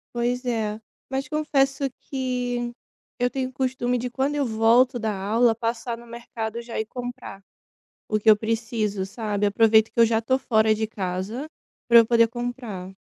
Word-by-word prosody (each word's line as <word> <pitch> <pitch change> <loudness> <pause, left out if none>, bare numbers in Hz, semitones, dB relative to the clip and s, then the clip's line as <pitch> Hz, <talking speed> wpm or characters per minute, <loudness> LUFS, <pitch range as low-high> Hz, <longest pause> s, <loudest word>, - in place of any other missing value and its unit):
Pois 245 +1 -1
é, 220 -3 -1 0.3
mas 270 +1 -2
confesso 275 -3 +1
que 245 -2 -2 0.5
eu 245 0 +1
tenho 260 -1 -3
costume 255 -1 -1
de 245 +1 -4
quando 275 +3 -1
eu 285 -1 +1
volto 235 +3 +3
da 220 -1 -1
aula, 220 +4 +2
passar 230 +1 -3
no 235 - -13
mercado 235 -1 -6
já 235 0 -5
e 220 - -1
comprar 245 -4 -7 0.7
o 215 - +1
que 210 - -10
eu 215 - +9
preciso, 220 -2 -2
sabe. 205 0 -2
Aproveito 220 +1 +4
que - - -4
eu 230 - +8
já 225 0 +2
tô 260 +4 +1
fora 220 -4 +3
de 220 0 -2
casa 200 +6 -4 0.4
para 235 -1 +8
eu 230 - +4
poder 230 -1 +5
comprar. 240 -6 -5
235 Hz, 170 wpm, -24 LUFS, 220-250 Hz, 0.7 s, eu